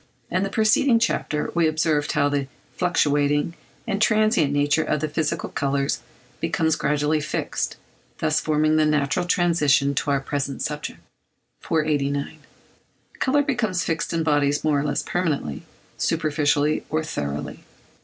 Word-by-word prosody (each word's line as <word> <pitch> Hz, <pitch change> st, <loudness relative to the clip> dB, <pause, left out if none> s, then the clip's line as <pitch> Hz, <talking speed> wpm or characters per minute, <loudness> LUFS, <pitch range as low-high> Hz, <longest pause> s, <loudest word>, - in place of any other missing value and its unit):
In 185 Hz, -, +1 dB
the 195 Hz, -, -1 dB
preceding 220 Hz, +4 st, +3 dB
chapter 155 Hz, -9 st, -1 dB
we 170 Hz, -1 st, +3 dB
observed 155 Hz, -2 st, 0 dB
how 145 Hz, -, +2 dB
the 145 Hz, -1 st, -1 dB, 0.3 s
fluctuating 145 Hz, -3 st, +1 dB, 0.3 s
and 200 Hz, -, -2 dB
transient 215 Hz, -9 st, +3 dB
nature 145 Hz, +2 st, +2 dB
of 150 Hz, -, 0 dB
the 155 Hz, -, -1 dB
physical 155 Hz, 0 st, -2 dB
colours 140 Hz, -1 st, -1 dB, 0.4 s
becomes 160 Hz, -1 st, +1 dB
gradually 150 Hz, +1 st, 0 dB
fixed, -, -, -3 dB, 0.4 s
thus 155 Hz, 0 st, +1 dB
forming 155 Hz, 0 st, +2 dB
the 155 Hz, -, +4 dB
natural 150 Hz, +3 st, +1 dB
transition 150 Hz, -6 st, +3 dB
to 145 Hz, -, -1 dB
our 140 Hz, -1 st, +2 dB
present 135 Hz, 0 st, -3 dB
subject. 150 Hz, 0 st, -4 dB, 0.6 s
489. 145 Hz, -3 st, -1 dB, 0.8 s
Colour 290 Hz, +2 st, +2 dB
becomes 220 Hz, -11 st, 0 dB
fixed 165 Hz, 0 st, -2 dB
in 165 Hz, -1 st, 0 dB
bodies 145 Hz, -2 st, +1 dB
more 150 Hz, -2 st, +2 dB
or -, -, -1 dB
less 145 Hz, -1 st, -1 dB
permanently; 150 Hz, -, -2 dB, 0.4 s
superficially, 150 Hz, -2 st, +1 dB
or 155 Hz, +1 st, 0 dB
thoroughly. 75 Hz, -, -4 dB
150 Hz, 135 wpm, -23 LUFS, 145-165 Hz, 0.8 s, the